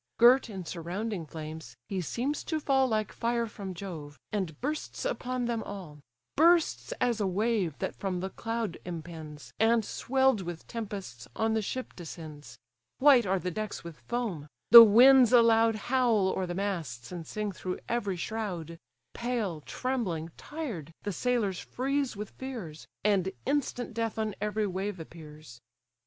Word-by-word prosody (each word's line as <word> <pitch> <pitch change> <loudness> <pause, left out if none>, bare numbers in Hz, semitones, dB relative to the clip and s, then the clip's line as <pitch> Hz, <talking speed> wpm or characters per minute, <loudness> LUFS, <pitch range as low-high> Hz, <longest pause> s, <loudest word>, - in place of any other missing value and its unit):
Girt 245 +1 +6
in 190 -4 -6
surrounding 175 +2 -4
flames, 160 +1 -8
he 190 -2 -2
seems 255 - -2
to 315 - -1
fall 270 -3 +3
Like 215 -3 0
fire 235 0 0
from 200 -4 -7
Jove, 160 -6 -7
and 185 -8 -3
bursts 300 - -3
upon 255 - -2
them 235 -1 -1
all: 180 -9 -8 0.4
Bursts 335 +1 +4
as 235 -3 0
a 200 - +2
wave 195 -4 0
that - - -3
from 190 -2 -3
the 190 +1 -4
cloud 225 -5 -3
impends, 160 -3 -8
And, 225 0 +4
swell'd 265 -3 +2
with 175 -2 -6
tempests, 195 - -6
on 220 0 +1
the 220 - +1
ship 255 +5 -5
descends; 155 -6 -9 0.4
White 260 -6 +6
are 190 +1 +2
the 180 0 -3
decks 215 +3 -4
with 170 -2 -9
foam; 215 -12 -3 0.2
the 235 0 +15
winds 245 +3 +8
aloud 230 -2 +5
Howl 235 -4 +2
o'er 190 -1 -1
the 175 - -4
masts, 165 - -3
and 170 -3 -6
sing 210 -1 -3
through 185 -1 -4
every 205 -6 -1
shroud: 175 -5 -4 0.3
Pale, 230 -10 -2
trembling, 185 - -2
tired, 240 - -6
the 205 - -2
sailors 215 -2 0
freeze 275 0 -1
with 210 0 -6
fears; 225 -13 -7 0.2
And 190 -2 +2
instant 260 -3 -1
death 225 -1 -2
on 215 -1 -1
every 210 0 0
wave 190 0 -3
appears. 155 -6 -11
205 Hz, 155 wpm, -29 LUFS, 170-235 Hz, 0.4 s, the